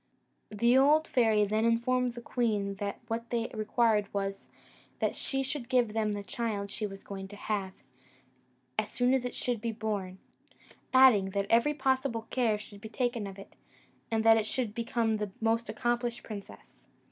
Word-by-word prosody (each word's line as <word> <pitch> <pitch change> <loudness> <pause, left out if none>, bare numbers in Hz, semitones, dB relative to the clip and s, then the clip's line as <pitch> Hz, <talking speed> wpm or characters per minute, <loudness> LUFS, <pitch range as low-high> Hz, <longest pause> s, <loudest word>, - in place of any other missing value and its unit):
The 235 +4 +3
old 300 +3 +4
fairy 220 -4 +3
then 215 +2 0
informed 240 +1 +1
the 240 - -8
queen 210 -6 0
that 200 0 -4
what 230 +1 -3
they 230 -1 -1
required 215 -1 +1
was, 195 -1 -3 0.5
that - - 0
she 270 -1 -2
should 265 -3 -4
give 245 -5 +2
them 215 -1 0
the 205 0 -4
child 200 -1 -3
she 210 0 -3
was 195 -1 -10
going 195 -1 -7
to 205 - -11
have, 200 -2 -3 1.1
as 210 - -1
soon 245 +3 +2
as 260 -2 +1
it 245 - -4
should 245 -4 -2
be 230 0 -1
born; 210 -4 -3 0.7
adding, 255 -7 +6
that 200 - +1
every 235 +6 +4
possible 265 -4 0
care 230 -5 +2
should 205 -1 -12
be 220 - -8
taken 240 -2 -1
of 195 0 -9
it, 195 - -12 0.6
and 225 -1 +1
that 225 0 +7
it 215 -1 0
should 235 -4 -2
become 230 -1 0
the 210 -1 -3
most 225 +1 0
accomplished 240 0 -1
princess. 205 -3 -10
225 Hz, 175 wpm, -30 LUFS, 205-240 Hz, 1.1 s, that